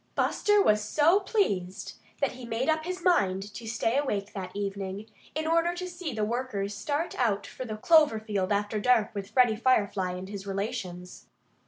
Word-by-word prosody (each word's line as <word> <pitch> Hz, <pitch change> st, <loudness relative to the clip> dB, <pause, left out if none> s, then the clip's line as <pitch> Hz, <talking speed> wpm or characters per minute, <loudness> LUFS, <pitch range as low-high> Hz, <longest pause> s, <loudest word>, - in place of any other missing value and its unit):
Buster 415 Hz, -1 st, +3 dB
was 210 Hz, -, +3 dB
so 310 Hz, -, +4 dB
pleased 200 Hz, -, -1 dB, 0.3 s
that 280 Hz, -, +2 dB
he 255 Hz, 0 st, -11 dB
made 235 Hz, +4 st, -2 dB
up 315 Hz, 0 st, +1 dB
his 365 Hz, 0 st, -4 dB
mind 200 Hz, -, +2 dB
to 225 Hz, +2 st, -8 dB
stay 225 Hz, +2 st, 0 dB
awake 205 Hz, -8 st, -2 dB
that 185 Hz, -2 st, -6 dB
evening, 200 Hz, 0 st, -4 dB, 0.3 s
in 310 Hz, +1 st, -1 dB
order 335 Hz, +2 st, +2 dB
to 365 Hz, +1 st, -4 dB
see 350 Hz, -3 st, -5 dB
the 215 Hz, -3 st, -1 dB
workers 215 Hz, -4 st, -2 dB
start 290 Hz, +11 st, -2 dB
out 215 Hz, -5 st, +1 dB
for 255 Hz, -, -7 dB
the 215 Hz, -2 st, -5 dB
clover 305 Hz, -3 st, +5 dB
field 205 Hz, -3 st, -2 dB
after 205 Hz, +1 st, 0 dB
dark 225 Hz, -1 st, +3 dB
with 200 Hz, -2 st, -5 dB
Freddie 245 Hz, -4 st, +4 dB
Firefly 205 Hz, -6 st, +1 dB
and 180 Hz, +1 st, -6 dB
his 200 Hz, 0 st, -7 dB
relations. 195 Hz, -3 st, -5 dB
220 Hz, 180 wpm, -28 LUFS, 200-295 Hz, 0.3 s, clover